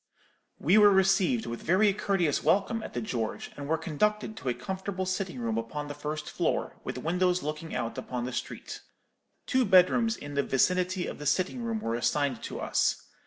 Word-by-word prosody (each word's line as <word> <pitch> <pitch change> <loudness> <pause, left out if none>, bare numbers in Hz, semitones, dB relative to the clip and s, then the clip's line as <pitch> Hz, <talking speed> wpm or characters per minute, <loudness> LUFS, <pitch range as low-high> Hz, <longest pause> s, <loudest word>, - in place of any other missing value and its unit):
We 185 +8 +4
were 205 -1 +8
received 195 +4 +3
with 120 - -5
very 195 +4 +3
courteous 190 -7 +1
welcome 225 +3 +2
at - - -8
the 120 - -1
George, 115 -1 -3
and 140 0 -6
were 160 +2 +1
conducted 210 +7 -1
to 130 - -3
a 120 - 0
comfortable 190 +7 -4
sitting 185 -4 -2
room 115 -1 -1
upon 145 +6 -5
the - - -4
first 150 +1 -5
floor, - - -1
with - - -4
windows 180 +1 +1
looking 155 +2 -4
out 115 +3 -3
upon 125 -1 -4
the 125 - -5
street. - - -5 0.6
Two 260 -1 +2
bedrooms 225 +4 +4
in 145 0 -8
the 140 - +2
vicinity 180 +7 +1
of - - -6
the 145 - -4
sitting 185 - +1
room 225 -2 -2
were 115 - -2
assigned 130 +1 0
to - - -6
us. - - 0
175 Hz, 190 wpm, -29 LUFS, 140-195 Hz, 0.6 s, were